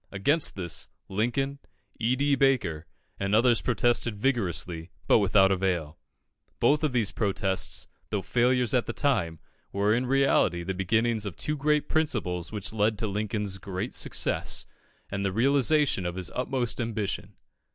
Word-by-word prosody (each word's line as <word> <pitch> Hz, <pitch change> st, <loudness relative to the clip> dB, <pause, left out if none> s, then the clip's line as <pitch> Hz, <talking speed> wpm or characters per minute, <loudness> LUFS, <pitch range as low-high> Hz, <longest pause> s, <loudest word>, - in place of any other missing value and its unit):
Against 140 Hz, +11 st, +1 dB
this, 85 Hz, -4 st, -4 dB, 0.2 s
Lincoln, 120 Hz, +7 st, -1 dB, 0.4 s
E. 120 Hz, +3 st, +2 dB
D. 140 Hz, +2 st, +2 dB
Baker, 125 Hz, -, +1 dB, 0.3 s
and 100 Hz, +1 st, +1 dB
others 120 Hz, 0 st, +4 dB
protested 120 Hz, -3 st, +1 dB
vigorously, 90 Hz, -, -1 dB, 0.2 s
but -, -, +5 dB
without 95 Hz, -1 st, +4 dB
avail. 90 Hz, -5 st, -1 dB, 0.6 s
Both 150 Hz, +3 st, +3 dB
of 155 Hz, -, +2 dB
these 115 Hz, -7 st, +1 dB
protests, 95 Hz, -1 st, -1 dB, 0.2 s
though 100 Hz, -3 st, -2 dB
failures 125 Hz, -1 st, +2 dB
at 125 Hz, -2 st, +2 dB
the -, -, -3 dB
time, 105 Hz, -, 0 dB, 0.3 s
were 100 Hz, +2 st, +2 dB
in 125 Hz, +2 st, 0 dB
reality 130 Hz, -10 st, +2 dB
the 95 Hz, +2 st, -3 dB
beginnings 110 Hz, +3 st, +1 dB
of 95 Hz, -, -6 dB
the -, -, -6 dB
two 150 Hz, -, -1 dB
great 150 Hz, +1 st, +1 dB
principles 105 Hz, -, -1 dB
which 105 Hz, -1 st, -5 dB
led 110 Hz, 0 st, +1 dB
to 110 Hz, -, -2 dB
Lincoln's 105 Hz, -1 st, -2 dB
great 95 Hz, +4 st, -4 dB
success, -, -, -1 dB, 0.5 s
and 100 Hz, 0 st, -2 dB
the 100 Hz, -, 0 dB
realisation 135 Hz, -, +2 dB
of 90 Hz, -, -4 dB
his 90 Hz, -2 st, -4 dB
utmost 125 Hz, -1 st, -2 dB
ambition. 105 Hz, -4 st, -3 dB
110 Hz, 150 wpm, -27 LUFS, 95-125 Hz, 0.6 s, but